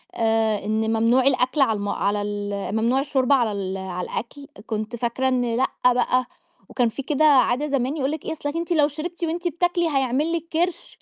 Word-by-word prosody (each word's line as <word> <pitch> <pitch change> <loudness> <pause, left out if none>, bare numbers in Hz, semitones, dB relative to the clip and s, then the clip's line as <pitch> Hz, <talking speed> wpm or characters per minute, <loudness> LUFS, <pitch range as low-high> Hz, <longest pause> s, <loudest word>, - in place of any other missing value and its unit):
آآ، 220 -2 +1
إن 220 +1 0
ممنوع 230 +3 +3
الأكل 260 +2 +2
على 230 -5 +4
الـم 205 0 -3
على 205 +1 0
ال 205 0 -3
ممنوع 235 +4 +2
الشُّرب 275 -1 +1
على 240 -5 +2
ال 195 -2 -3
على 185 -1 -5
الأكل، 280 +4 -6 0.2
كنت 215 +1 -4
فاكرة 240 +3 -1
إن 245 -3 0
لأ 260 +3 +2 0.3
بقى، 250 +1 +1 0.4
وكان 245 -3 +1
فيه 275 +5 -6
كده 300 +2 +1
عادة 280 -1 +4
زمان 275 +1 -1
يقول 275 -1 0
لِك 310 -1 -6
إيه - - -2
أصلِك 290 -1 -5
أنتِ 335 +1 -3
لو 300 -3 +4
شربتِ 320 +4 -6
وأنتِ 340 +2 -1
بتاكلي، 345 0 0
هيعمل 275 +3 0
لِك 335 -1 -3
كرش، 345 +1 -2
255 Hz, 195 wpm, -23 LUFS, 220-300 Hz, 0.4 s, على